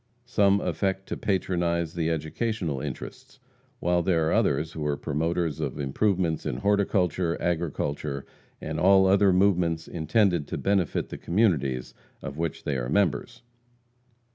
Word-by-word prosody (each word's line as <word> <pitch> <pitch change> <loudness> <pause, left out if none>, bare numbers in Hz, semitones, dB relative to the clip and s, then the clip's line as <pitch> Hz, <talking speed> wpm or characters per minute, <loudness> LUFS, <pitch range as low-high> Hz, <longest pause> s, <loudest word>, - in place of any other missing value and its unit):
Some 100 0 +3
affect 95 -1 -1
to - - -2
patronize 85 -4 -1
the 85 -2 -1
educational 80 - -2
interests, - - -7 0.4
while 90 0 +2
there 85 -3 +1
are - - +1
others 75 +3 +1
who 80 -2 -5
are 70 -1 0
promoters 80 +1 -1
of - - -3
improvements 85 +4 0
in 75 -5 -2
horticulture, 95 - +1
agriculture, 75 -4 -2 0.3
and - - -4
all 95 +2 +6
other 95 +1 +5
movements 90 -4 +2
intended 85 -1 +1
to - - -4
benefit 95 -4 0
the - - -7
communities 75 - 0 0.3
of 70 - -7
which 85 -2 -3
they 70 -2 -1
are - - -3
members. 100 - 0
85 Hz, 140 wpm, -26 LUFS, 75-95 Hz, 0.4 s, all